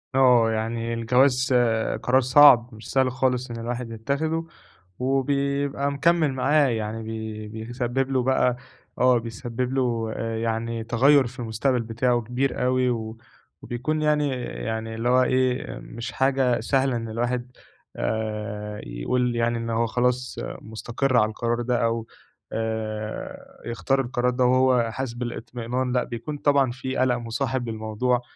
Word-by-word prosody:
آه 125 -4 +5
يعني 115 +1 -2
الجواز 125 +3 +2 0.5
قرار 130 +2 +4
صعب 130 -2 +7
مش 110 +1 -10
سهل 130 -1 +2
خالص 125 -1 0
إن 115 - -5
الواحد 120 0 -4
يتخذه، 155 +8 -2 0.5
وبيبقى 140 +1 0
مكمل 155 0 +2
معاه 145 +2 +3
يعني 110 0 -3
بي 110 -1 -6
بيسبب 120 +4 -3
له 130 -2 +2
بقى 125 -1 +2 0.4
آه 125 -1 +5
بيسبب 120 +2 -4
له 115 -4 0
يعني 115 0 -2
تغيّر 130 +3 +4
في 125 +1 -12
المستقبل 120 +2 0
بتاعه 120 +2 0
كبير 125 +3 -1
أوي، 130 0 +2 0.7
وبيكون 155 +6 -2
يعني، 150 -1 +2
يعني 110 -1 -4
اللي 115 +2 -1
هو 130 0 +5
إيه 130 0 0
مش 120 +3 -7
حاجة 130 -2 +2
سهلة 130 +2 +1
إن 115 -1 -4
الواحد 120 +2 -2 0.4
آآ 105 -1 -3
يقول 120 - -1
يعني 115 0 +1
إن 115 0 -4
هو 115 +1 +1
خلاص 125 +2 0 0.2
مستقر 120 +4 -1
على 105 - +5
القرار 120 +2 -1
ده، 120 0 0
أو 115 0 -1 0.4
آآ 110 -1 -5
يختار 135 +3 0
القرار 125 0 0
ده 125 0 +1
وهو 125 -2 +3
حاسس 130 -1 -4
بالاطمئنان 120 +1 -3
لأ، 125 - +2
بيكون 120 +6 -6
طبعًا 140 -3 +3
في 130 +1 -5
قلق 130 -1 +3
مصاحب 120 +1 -2
للموضوع، 110 +3 -1
120 Hz, 140 wpm, -24 LUFS, 115-130 Hz, 0.7 s, صعب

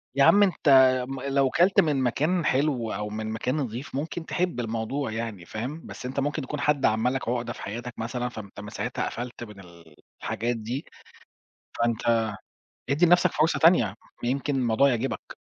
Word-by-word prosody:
يا 140 - +4
عم 205 +7 +7
أنت 185 -6 +1 0.4
م 135 -1 -5
لو 135 -1 +2
كلت 180 +6 +3
من 145 -4 +1
مكان 155 +8 +1
حلو 130 -5 +1
أو 105 +1 -3
من 110 +1 -4
مكان 115 +4 -2
نضيف، 130 0 -4
ممكن 160 +3 -4
تحب 180 -8 -1
الموضوع 115 +3 -2
يعني 110 -5 -5
فاهم، 130 - -5
بس - - -9
أنت 130 +2 -3
ممكن 145 +1 -1
يكون 150 +3 -5
حد 145 -1 +2
عمل 110 +4 +2
لك 130 -3 -3
عُقدة 120 -1 -2
في - - -11
حياتك 120 +4 -6
مثلًا 125 +2 -2
فأنت 105 -3 -10
من 105 - -7
ساعتها - - -3
قفلت 120 0 -6
من 105 -3 -11
ال 85 -4 -16 0.3
الحاجات 120 +3 -1
دي، 120 +7 -4 0.9
فأنت 115 -1 +1 0.6
ادِّي 145 +5 +4
لنفْسك 175 +1 +5
فرصة 160 +2 +1
تانية، 165 -8 +6 0.4
ما 120 - 0
يمكن 140 +2 -1
الموضوع 125 +1 +3
يعجبك! 125 +1 -3
125 Hz, 180 wpm, -26 LUFS, 110-145 Hz, 0.9 s, عم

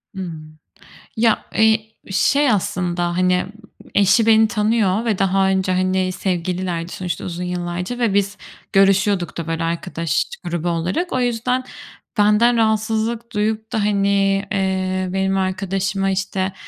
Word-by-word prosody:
Hımm, 155 -4 -8 0.6
ya, 225 -1 +2
eee, 220 0 +3 0.2
şey 280 +6 +3
aslında, 175 -3 -1
hani, 180 0 +2 0.5
eşi 205 +3 +4
beni 220 0 +5
tanıyor 215 -1 +1
ve 215 -4 0
daha 195 0 +2
önce, 190 -1 +1
hani, 185 0 +1
sevgililerdi 180 -2 -2
sonuçta, 180 -2 -4
uzun 180 0 -4
yıllarca 180 +6 -4
ve 230 -5 +1
biz 200 0 0 0.4
görüşüyorduk 195 -2 +3
da, 165 -1 -4
böyle, 165 0 -2
arkadaş 165 -2 -1 0.2
grubu 175 0 -2
olarak. 175 - -2
O 255 - +1
yüzden, 245 +2 0 0.5
benden 210 +3 +4
rahatsızlık 225 +1 0
duyup 220 +1 -1
da, 220 - 0
hani, 200 -1 +2
eee, 185 -1 -1
benim 190 0 0
arkadaşıma, 195 +1 -1
işte, 190 0 -2
195 Hz, 130 wpm, -20 LUFS, 180-215 Hz, 0.6 s, beni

